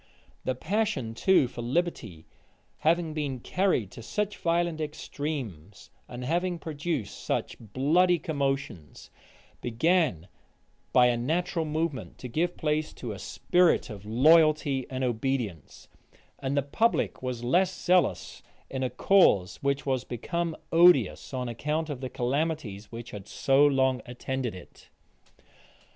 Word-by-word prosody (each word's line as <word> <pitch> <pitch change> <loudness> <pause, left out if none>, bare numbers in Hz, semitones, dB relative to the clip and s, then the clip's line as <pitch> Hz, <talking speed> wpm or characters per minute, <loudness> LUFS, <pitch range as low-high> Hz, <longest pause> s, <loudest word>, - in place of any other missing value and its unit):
The 130 - 0
passion 160 - -1
too 140 +3 +3
for 120 - -8
liberty, 120 - -2 0.5
having 165 0 +1
been 145 -4 -3
carried 180 - 0
to - - -10
such 210 - -2
violent 170 -1 0
extremes, 140 - -6 0.2
and 125 0 -7
having 175 +4 0
produced 155 -6 -4
such - - -2
bloody 150 - +2
commotions, 135 - -3 0.5
began, 120 - +1 0.6
by 125 - +6
a 120 -1 +3
natural 165 +6 -1
movement, 150 - -3
to 125 - -7
give 170 +8 -1
place 155 -1 -1
to 120 - -6
a 100 - -7
spirit 175 - +2
of 100 -2 -9
loyalty 145 +3 +4
and 130 -1 -3
obedience; 120 - -3 0.5
and 140 +1 -2
the 140 - +2
public 220 - 0
was 125 -2 -4
less 180 +10 +3
zealous 180 - +1 0.3
in 135 - -3
a 130 - 0
cause 115 - +3
which 140 0 -1
was 130 -3 0
become 170 +8 -3
odious, 175 +2 +4
on 125 -2 -3
account 150 +7 -2
of 135 -3 -6
the 130 - -4
calamities 125 -6 -2
which 115 0 -8
had 105 -1 -8
so 135 0 +3
long 130 -2 +2
attended 125 -2 -4
it. 90 - -14
140 Hz, 130 wpm, -28 LUFS, 120-165 Hz, 0.6 s, by